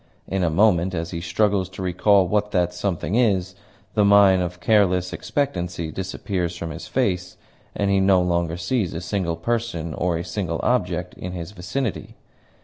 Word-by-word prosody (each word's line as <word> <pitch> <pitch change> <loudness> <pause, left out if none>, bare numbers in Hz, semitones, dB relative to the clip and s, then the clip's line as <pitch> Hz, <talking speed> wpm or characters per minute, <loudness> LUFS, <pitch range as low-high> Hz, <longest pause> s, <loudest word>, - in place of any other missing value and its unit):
In 95 0 -1
a 85 - +2
moment, 90 0 +3
as 85 0 -3
he 85 -2 -4
struggles 95 +2 +1
to 95 0 -7
recall 95 +1 +3
what 105 +2 +1
that 90 -3 +1
something 90 -2 -2
is, 100 -6 +2 0.4
the 105 - +3
mien 100 -2 +6
of 90 0 -4
careless 90 -3 +2
expectancy 90 - -2
disappears 90 -1 -3
from 85 -1 -5
his 80 +1 -8
face, 90 -8 -1 0.4
and 100 -1 +1
he 100 - +3
no 95 -1 +4
longer 85 -1 0
sees 90 +1 -1
a - - -2
single 85 -1 -2
person 85 -4 -2
or 85 +2 0
a 85 - -3
single 85 -2 -3
object 90 -7 0
in 90 0 -7
his 85 0 -6
vicinity. 105 +5 -4
90 Hz, 170 wpm, -23 LUFS, 85-100 Hz, 0.4 s, mien